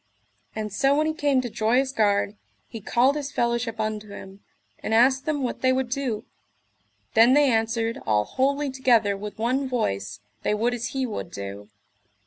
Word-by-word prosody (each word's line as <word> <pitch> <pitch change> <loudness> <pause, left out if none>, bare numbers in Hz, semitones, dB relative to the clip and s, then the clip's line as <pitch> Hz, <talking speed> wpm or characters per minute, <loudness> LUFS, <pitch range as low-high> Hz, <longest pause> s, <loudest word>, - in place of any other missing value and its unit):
And 215 -2 -4
so 275 +6 +3
when 305 +1 +2
he 315 - 0
came 285 -4 +1
to 245 - -5
Joyous 245 +6 +1
Gard 205 -4 +1 0.3
he 225 - -8
called 255 +7 +2
his 290 -1 -4
fellowship 235 -2 -1
unto 215 -1 -3
him, 195 -1 -10 0.4
and 220 - -1
asked 265 +4 +4
them 295 -3 0
what 245 - -3
they 260 - +3
would 260 -1 -1
do. 255 -6 -2 0.9
Then 235 +4 +6
they 290 -2 +4
answered 225 0 0
all 105 -1 +2
wholly 280 - 0
together 235 -6 +2
with 205 +1 -7
one 255 +4 0
voice 100 - -2 0.2
they 210 - 0
would 235 +3 0
as 240 -1 -3
he 265 -1 -2
would 215 -7 -5
do. 100 -1 -8
235 Hz, 175 wpm, -25 LUFS, 210-265 Hz, 0.9 s, Then